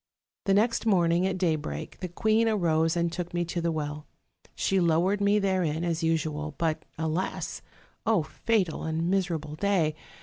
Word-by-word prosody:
The 195 - +3
next 230 +2 +2
morning 175 -2 +3
at 190 -1 -1
daybreak, 155 - -2
the 180 - -3
queen 220 +5 +2
arose 165 -5 +2
and 170 0 +1
took 175 0 -5
me 175 0 +1
to 170 +1 -3
the 170 0 0
well. 150 -1 -4 0.5
She 195 - +1
lowered 175 +4 +2
me 200 +1 +4
therein, 185 -5 0
as 170 -1 -1
usual, 155 -2 -1
but, 160 -2 -1
alas! 160 +3 -2 0.6
fatal 200 -6 0
and 160 +2 -1
miserable 170 -6 -1
day! 170 -3 +1
170 Hz, 155 wpm, -28 LUFS, 160-190 Hz, 0.6 s, me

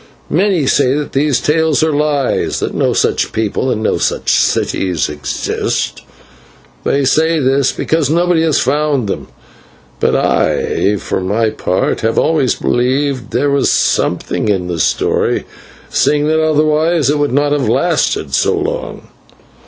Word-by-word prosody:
Many 180 -3 +1
say 135 0 +2
that 150 0 -3
these 140 -2 +1
tales 160 0 +1
are 160 - +2
lies, 145 -2 0
that - - -3
no - - +1
such - - 0
people 110 +4 -1
and 110 -3 -1
no - - 0
such - - 0
cities 90 -5 0
exist, 75 -1 -3 0.8
and - - 0
they 140 0 +1
say 160 +4 +2
this 135 0 +2
because 160 -3 -1
nobody 170 +1 +2
has 160 -3 +2
found 145 -3 0
them; 100 - -4 0.7
but - - +1
I, 105 +2 +1
for 95 - -3
my 110 +4 0
part, 95 -3 -1
have 115 0 -1
always 150 -6 +2
believed 130 +1 -1
there 145 0 0
was 140 0 +2
something - - 0
in 95 -3 0
the 90 -2 -4
story, - - 0 0.5
seeing 150 0 +2
that 160 0 +2
otherwise 155 0 +2
it 150 - 0
would 145 -2 0
not 145 +2 +1
have 145 -2 0
lasted - - 0
so - - +2
long. - - -4
140 Hz, 150 wpm, -15 LUFS, 120-155 Hz, 0.8 s, say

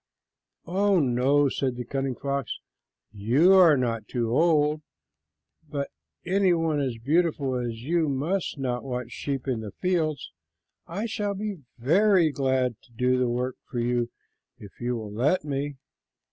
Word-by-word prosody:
"Oh, 195 +2 +2
no," 135 +2 +3
said 130 -1 -1
the 125 0 -5
cunning 135 0 -2
fox, 140 -1 -3 0.5
"you 120 - +4
are 175 -6 +7
not 115 -3 0
old, 150 +5 +2 0.9
but 140 -2 -3 0.3
any 190 0 +3
one 165 -3 +1
as 130 -4 -2
beautiful 145 +1 +1
as 120 -2 -3
you 160 +2 +1
must 155 +7 -1
not 125 -3 -2
watch 125 -2 -4
sheep 135 -2 -4
in 125 -4 0
the 105 -3 -7
fields. 160 - -1 0.6
I 195 +7 -3
shall 210 -3 -2
be 205 -2 -4 0.2
very 170 - +4
glad 130 -3 0
to 125 - -25
do 125 +2 +1
the 125 -1 +1
work 125 +1 -2
for - - -5
you 120 0 0 0.5
if 105 -5 -12
you 120 0 -1
will 110 -3 -6
let 145 - +1
me." 145 0 -3
135 Hz, 145 wpm, -26 LUFS, 125-165 Hz, 0.9 s, are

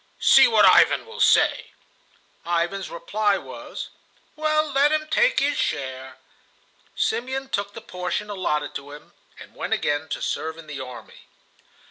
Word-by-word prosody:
"See - - +7
what 460 - +5
Ivan - - +5
will 460 0 -11
say." - - +3 0.7
Ivan's 175 +3 -2
reply 205 +3 0
was: - - -8 0.5
"Well, 310 0 0
let 280 +2 +3
him 310 0 0
take 485 +10 +2
his 290 +1 0
share." 130 -1 -3 0.8
Simeon 260 +4 -2
took 200 -4 -3
the 230 - -9
portion 180 0 -4
allotted 150 -8 -2
to 145 +1 -8
him, 150 - -14 0.3
and - - -13
went - - -3
again 145 +2 -1
to - - -3
serve 160 0 -3
in 165 - -11
the 150 -3 -7
army. 125 -2 -11
195 Hz, 145 wpm, -23 LUFS, -, 0.8 s, See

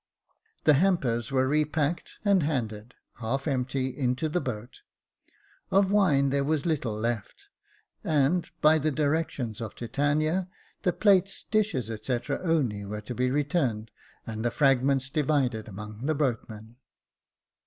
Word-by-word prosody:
The 150 - +6
hampers 135 - +1
were 130 -1 +2
repacked, 150 +2 0
and 200 -2 +4
handed, 120 -6 -3 0.2
half 130 +5 -2
empty, 130 -1 -1
into 130 +3 0
the 175 +3 0
boat. 120 -1 -6 0.9
Of 195 0 +3
wine 150 -10 +3
there 140 0 +1
was 150 0 0
little 140 -10 -1
left; 110 -1 -4 0.5
and, 155 +3 +1
by 155 +1 +6
the 155 +1 +1
directions 145 -6 -1
of 110 - -6
Titania, 155 +8 0 0.3
the 180 - +2
plates, 195 0 +2
dishes, 205 - 0
&c., 120 +2 0
only 140 - 0
were 105 +1 -5
to 115 +4 -6
be 125 +1 0
returned, 135 -6 0 0.3
and 110 -1 -5
the 120 - +2
fragments 135 0 +2
divided 135 -6 0
among 105 +4 -7
the 155 - +1
boatmen. 115 -5 -3
135 Hz, 130 wpm, -27 LUFS, 120-155 Hz, 0.9 s, The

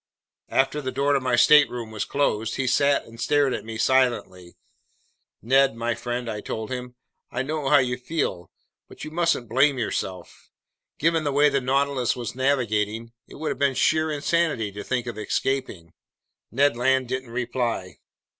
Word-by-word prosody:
After 135 +3 +1
the 130 -2 -3
door 140 +2 +1
to 140 - +3
my 130 -2 0
stateroom 125 -4 +4
was 110 -2 -3
closed, 115 -6 -1
he 130 - -1
sat 140 +3 +2
and 115 +1 -12
stared 145 -3 +2
at - - -4
me 110 0 -7
silently. 115 -9 0 0.9
"Ned 135 +1 +3
my 120 +1 -1
friend," 120 +1 -4
I 105 -2 -4
told 110 +2 -5
him, 125 -1 -6 0.3
"I 125 - -2
know 150 0 -2
how 145 - +6
you 125 -2 +1
feel, 125 - -3 0.4
but - - -11
you 155 - -7
mustn't 165 -7 0
blame 135 +5 +3
yourself. 95 -6 -5 0.5
Given 165 +1 +1
the 145 - 0
way 145 +2 +4
the 140 - 0
Nautilus 135 -1 +1
was 120 -3 -5
navigating, 115 -4 0 0.2
it - - -13
would 155 +1 -3
have - - -4
been 140 -2 +2
sheer 155 +4 +2
insanity 150 -7 0
to 105 +1 -7
think 125 -2 -2
of 120 -3 -6
escaping!" 110 -7 -2 0.6
Ned 140 +3 +2
Land 130 +1 +1
didn't 130 0 -4
reply. 120 -5 -3
130 Hz, 170 wpm, -24 LUFS, 115-140 Hz, 0.9 s, how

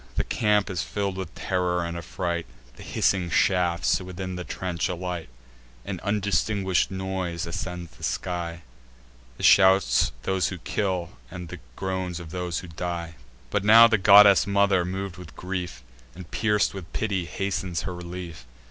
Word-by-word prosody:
The - - +1
camp 105 -2 +1
is 90 -2 -2
fill'd 100 -2 -3
with 95 -2 -6
terror 90 -2 -1
and 85 0 -4
affright: 85 0 -3 0.3
The - - -13
hissing 90 -3 0
shafts 90 0 +2
within 95 0 -6
the 90 - -5
trench 90 -1 -3
alight; 90 -4 -4 0.6
An - - -4
undistinguish'd 100 -2 +1
noise 95 -3 -3
ascends 90 -1 -5
the 65 - -19
sky, 85 -2 -3 0.7
The - - -9
shouts 95 0 +5
of - - -18
those 95 -1 +1
who 95 - -5
kill, 90 -1 -2 0.2
and 90 -2 -7 0.2
groans 95 -2 -3
of 85 -3 -9
those 90 -1 -3
who 90 - -10
die. 85 0 -5 0.4
But 105 -1 0
now 115 +3 +9
the 110 -3 +2
goddess 100 0 +7
mother, 100 -2 +3
mov'd 95 0 -4
with 90 -2 -11
grief, 90 -7 -5 0.3
And 90 -1 -11
pierc'd 105 -1 +1
with 95 -4 -9
pity, 100 -5 -1
hastens 95 -2 -3
her 90 - -4
relief. 85 -5 -8
90 Hz, 155 wpm, -25 LUFS, 85-95 Hz, 0.7 s, now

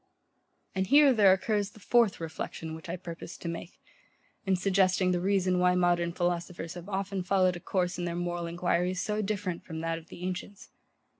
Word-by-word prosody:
And 190 0 -1
here 285 +2 +7
there 205 -5 +6
occurs 205 +1 +1
the 215 - -17
FOURTH 230 0 +3
reflection 160 0 -5
which 160 +2 -9
I 175 - -2
purposed 170 -1 -8
to - - -4
make, 170 +1 -6 0.7
in 190 - +4
suggesting 185 0 +2
the 175 -1 0
reason 190 -1 +2
why 180 0 +4
modern 175 -1 +2
philosophers 175 -1 -2
have 175 +2 -9
often 195 -1 -2
followed 185 0 +2
a - - -6
course 180 0 -1
in 175 - -2
their 170 -1 -2
moral 175 -1 -2
enquiries 175 +1 0
so 210 0 -1
different 195 -4 -3
from 160 -2 -6
that 165 0 -2
of 165 - -18
the 175 - -10
ancients. 185 +2 -6
180 Hz, 190 wpm, -29 LUFS, 175-195 Hz, 0.7 s, here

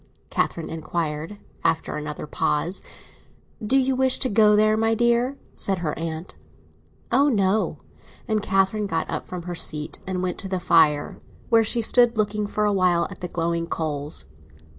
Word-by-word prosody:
Catherine 165 - -1
inquired, 160 +2 -3 0.3
after 165 0 0
another 150 0 -5
pause. 150 +4 -1 0.8
"Do 255 +6 +2
you 265 0 +2
wish 260 0 +3
to 260 - 0
go 210 0 +5
there, 215 +1 +4
my 225 +1 +2
dear?" 240 +3 +2 0.2
said 195 -1 0
her 150 - -1
aunt. 165 +1 -5 0.8
"Oh 275 +4 +4
no!" 205 -3 +1 0.5
And 215 -1 +1
Catherine 195 +1 +1
got 165 -4 -1
up - - -4
from 180 -1 -6
her 175 0 -5
seat 150 -2 -2
and 185 -1 -2
went 180 -1 -2
to 195 - -4
the 185 -1 -1
fire, 150 -4 +3 0.3
where 230 -1 +5
she 230 +1 0
stood 240 0 +5
looking 210 -1 0
a 210 -1 +2
while 180 -3 +2
at 190 - -11
the 180 - -3
glowing 170 0 -2
coals. 150 -3 -4
190 Hz, 160 wpm, -24 LUFS, 165-220 Hz, 0.8 s, go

